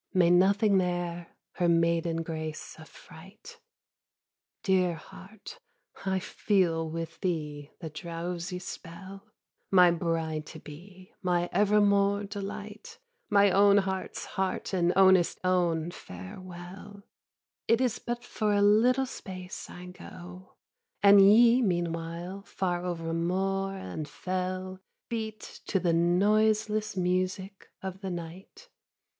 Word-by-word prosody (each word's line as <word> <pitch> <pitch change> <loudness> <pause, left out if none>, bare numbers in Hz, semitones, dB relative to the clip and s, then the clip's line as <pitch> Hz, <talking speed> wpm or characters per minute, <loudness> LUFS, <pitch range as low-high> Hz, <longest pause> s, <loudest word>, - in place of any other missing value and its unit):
May 175 -2 +5
nothing 195 +3 +4
there 175 -1 -3 0.2
her 175 -2 +2
maiden 165 0 +1
grace 160 -1 -6
affright! 170 +5 -14 1.0
Dear 185 -3 +2
heart, 215 - -12 0.4
I 190 -1 0
feel 175 -4 0
with 165 0 -6
thee 150 -5 -3
the 160 -3 -6
drowsy 170 +2 -5
spell. 190 +2 -9 0.4
My 180 -2 +6
bride 165 -2 -2
to 160 - -10
be, 185 +5 -13
my 175 -2 0
evermore 200 0 +3
delight, 205 - -7 0.3
My 200 -1 +5
own 200 +1 +5
heart's 190 -1 -2
heart 190 0 -3
and 175 -2 +2
ownest 190 -2 +5
own 175 -3 +1
farewell; 180 - -10 0.6
It 230 - +4
is 255 -3 0
but 240 0 -4
for 215 -3 -1
a 205 - +3
little 240 +6 +4
space 185 -6 -8
I 180 - -10
go: 180 0 -12 0.5
And 200 0 +8
ye 230 +5 +7
meanwhile 170 -1 -2
far 180 -3 -2
over 165 -2 -3
moor 195 +3 -1
and 155 -5 -6
fell 185 +2 -4 0.3
Beat 220 -2 -5
to 195 - +1
the 175 -2 +1
noiseless 215 +4 +2
music 185 +2 -2 0.2
of 190 0 -6
the 190 - -4
night! 175 +1 -8
185 Hz, 115 wpm, -29 LUFS, 170-200 Hz, 1.0 s, And